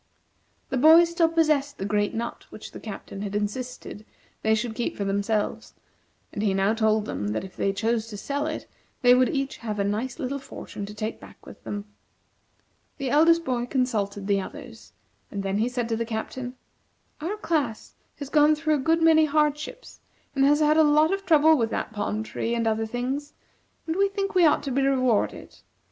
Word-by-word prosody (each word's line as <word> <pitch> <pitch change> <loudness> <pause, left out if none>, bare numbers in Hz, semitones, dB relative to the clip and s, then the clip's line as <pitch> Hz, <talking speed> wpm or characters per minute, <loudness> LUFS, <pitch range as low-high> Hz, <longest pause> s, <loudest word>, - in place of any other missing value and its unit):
The 265 - -1
boys 325 +5 +7
still 335 -1 +3
possessed 305 -4 +1
the 195 - -4
great 205 0 0
nut 235 +1 -5
which - - -10
the - - -9
Captain 200 -2 -8
had 205 -1 -4
insisted 215 +1 -4 0.4
they 220 0 +3
should 225 +1 -2
keep 240 +1 -3
for 200 - -2
themselves, 200 +2 -1 0.6
and 205 - -3
he 200 -3 +1
now 195 +2 +2
told 220 -1 +1
them 105 - -4
that 110 - -2
if 190 - -10
they 195 - 0
chose 225 +2 -1
to 210 -2 -8
sell 285 +8 -2
it, 310 - -4 0.4
they 245 0 +7
would 255 0 +4
each 275 -1 -2
have 215 -3 -5
a 200 - +1
nice 215 +6 -2
little 280 -2 -3
fortune 205 -6 -8
to 210 - -9
take 215 +1 -4
back - - -15
with - - -13
them. 205 0 -5 1.1
The 275 -3 -3
eldest 330 +3 +4
boy 245 -3 -1
consulted 210 -7 -1
the 200 -1 +1
others, - - -11 0.4
and 200 -1 -4
then 195 +1 -1
he 230 +3 +1
said 245 -2 -2
to 225 - 0
the 230 - -1
Captain: 245 +3 -5 0.7
"Our 370 +7 -3
class 295 - -2 0.2
has 285 -2 -7
gone 300 0 +5
through 310 0 0
a - - +3
good 325 +4 +2
many 315 -1 +6
hardships, 300 - -1 0.4
and 270 - +3
has 295 +2 +4
had 305 +1 +4
a 315 - +7
lot 305 +3 +4
of 390 -1 -4
trouble 315 -1 +6
with 230 -6 0
that - - -3
palm 210 +1 -2
tree 230 +1 -3
and 230 -1 -1
other 220 0 0
things, 260 +5 -3 0.5
and 320 - -2
we 395 +1 +3
think 395 0 -3
we 360 -3 +6
ought 295 - +2
to 275 - -3
be 270 +2 +1
rewarded. 255 -5 0
250 Hz, 200 wpm, -25 LUFS, 215-305 Hz, 1.1 s, boys